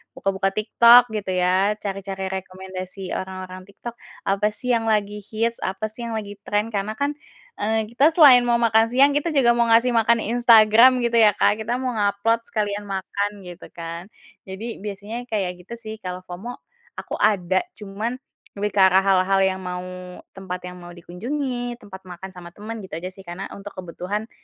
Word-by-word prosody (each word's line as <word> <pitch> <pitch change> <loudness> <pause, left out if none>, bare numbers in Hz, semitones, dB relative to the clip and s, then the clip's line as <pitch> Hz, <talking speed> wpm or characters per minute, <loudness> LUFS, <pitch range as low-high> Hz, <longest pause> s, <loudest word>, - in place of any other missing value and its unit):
buka-buka 195 0 -1
TikTok 235 +2 +6
gitu 200 -3 -3
ya 185 +3 +2
cari-cari 195 -2 -5
rekomendasi 185 0 -7
orang-orang 185 0 -6
TikTok, 235 +4 -9 0.3
apa 200 +2 +1
sih 250 +4 -3
yang 230 -2 +1
lagi 210 -1 0
hits, 225 +3 -2
apa 190 +3 -3
sih 235 +2 -7
yang 230 - -4
lagi 205 -2 -6
trend, 210 +2 0
karena 210 +1 -3
kan, 285 +4 -1 0.5
eee, 220 +1 0
kita 290 +7 +3
selain 255 -7 +8
mau 240 - +3
makan 230 -1 +3
siang 270 +4 +4
kita 295 +2 -1
juga 250 -4 +5
mau 235 0 +2
ngasih 230 +2 +4
makan 230 0 +3
Instagram 235 +1 +6
gitu 235 0 +1
ya, 210 -3 +5
Kak, 205 +1 +2
kita 225 +2 -2
mau 255 0 -2
nge-upload 205 +3 +1
sekalian 205 -1 -2
makan 200 +1 -2
gitu 175 -1 -10
kan. 170 +1 -7 0.4
Jadi 215 +5 -6
biasanya 210 +4 -6
kayak 180 -5 -3
gitu 235 - -6
sih, 220 -2 -8
kalau 180 -2 -6
FOMO 185 +7 -7 0.4
aku - - -6
ada 190 -3 +2 0.2
cuman 210 +4 -4 0.4
lebih 205 +1 -1
ke 200 - -1
arah 190 0 +5
hal-hal 195 0 +3
yang 190 0 0
mau, 180 -1 -5 0.5
tempat 185 -2 -7
yang 180 0 -8
mau 175 0 -11
dikunjungi, 245 - -4
tempat 190 -1 -12
makan 180 +2 -8
sama 175 -2 -12
teman 220 +2 -7
gitu 185 - -8
aja 175 +3 -5
sih. 195 +1 -14
Karena 175 +3 -7
untuk 200 +1 -9
kebutuhan, 185 +4 -5
205 Hz, 175 wpm, -22 LUFS, 190-230 Hz, 0.5 s, selain